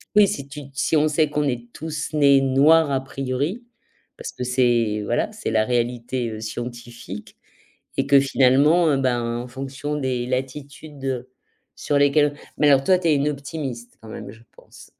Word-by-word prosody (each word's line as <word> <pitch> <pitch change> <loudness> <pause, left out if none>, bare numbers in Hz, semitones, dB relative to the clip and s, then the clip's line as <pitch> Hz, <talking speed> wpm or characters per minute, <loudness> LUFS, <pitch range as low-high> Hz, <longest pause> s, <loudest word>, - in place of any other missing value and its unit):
Oui, 210 -1 +7
si 140 -6 -4
tu 145 +1 -9
te 135 - -22
si 160 - +1
on 150 +1 +3
sait 155 0 +1
qu'on 150 0 -1
est 120 -2 -4
tous 155 +2 -5
nés 140 -2 +5
noirs 145 +4 +4
a 135 -1 -1
priori, 135 - -3 0.5
parce 475 - -7
que - - -6
c'est, 120 -4 +1
voilà, 120 - -1
c'est 215 0 -5
la 110 -1 +2
réalité 120 -1 -2
scientifique 120 -2 -8 0.6
et 135 - 0
que 140 0 +6
finalement, 140 +5 +4
heu, 140 - +2
ben, 125 -3 0 0.2
en 125 - -9
fonction 135 +3 -5
des 130 -4 -2
latitudes 135 0 -5 0.5
sur 145 - -2
lesquelle 145 +1 +3 0.2
mais 150 - +4
alors 135 -1 +4
toi 185 +3 +4
tu 175 -2 -1
es 155 - +4
une 140 +1 +1
optimiste 140 -4 -6
quand 110 - -12
même, 105 -2 -8
je 115 +2 -16
pense? - - -16
135 Hz, 175 wpm, -22 LUFS, 120-150 Hz, 0.6 s, Oui